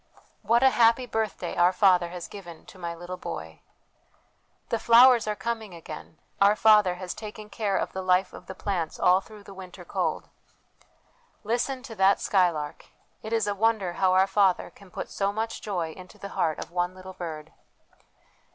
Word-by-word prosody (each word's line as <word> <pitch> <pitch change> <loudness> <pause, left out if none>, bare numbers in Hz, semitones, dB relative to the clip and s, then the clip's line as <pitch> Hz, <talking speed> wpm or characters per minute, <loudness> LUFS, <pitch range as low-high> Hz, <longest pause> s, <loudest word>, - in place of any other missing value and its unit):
' - - -37
What 235 +2 +5
a 265 - +6
happy 235 +1 +4
birthday 220 -6 -3
our 175 +1 +4
Father 180 -3 +3
has 175 0 -7
given 175 -5 -11
to 190 - -15
my 170 -1 -4
little 175 +2 -7
boy! 80 - -7 0.4
' - - -39
' - - -42
The 230 - +1
flowers 235 0 +6
are 210 - -1
coming 220 -3 -4
again; 160 -1 -10 0.2
our 200 +1 +6
Father 210 -4 +5
has 180 0 -6
taken 215 -1 -9
care 200 -1 -1
of - - -2
the 190 - -3
life 185 0 +2
of 180 - -12
the 190 - -7
plants 180 -5 -3
all 180 +1 +4
through 210 +1 -14
the 200 - -12
winter 185 -2 -11
cold! - - -2 0.4
' - - -35
' 485 -1 -37
Listen 245 +4 -1
to 255 -4 -9
that 195 -1 +3
skylark! 170 -6 0 0.3
It 220 - -7
is 225 -2 +1
a 205 - 0
wonder 205 -3 +1
how 185 +1 +2
our 190 +1 +5
Father 195 -1 +2
can 200 -2 -17
put - - -6
so 200 0 0
much 225 +2 -4
joy 175 -6 -3
into 185 +2 -13
the 200 - -8
heart 160 -5 -1
of - - -7
one 175 +1 -1
little 185 0 -10
bird.' 160 -4 -7
195 Hz, 195 wpm, -26 LUFS, 180-215 Hz, 0.4 s, a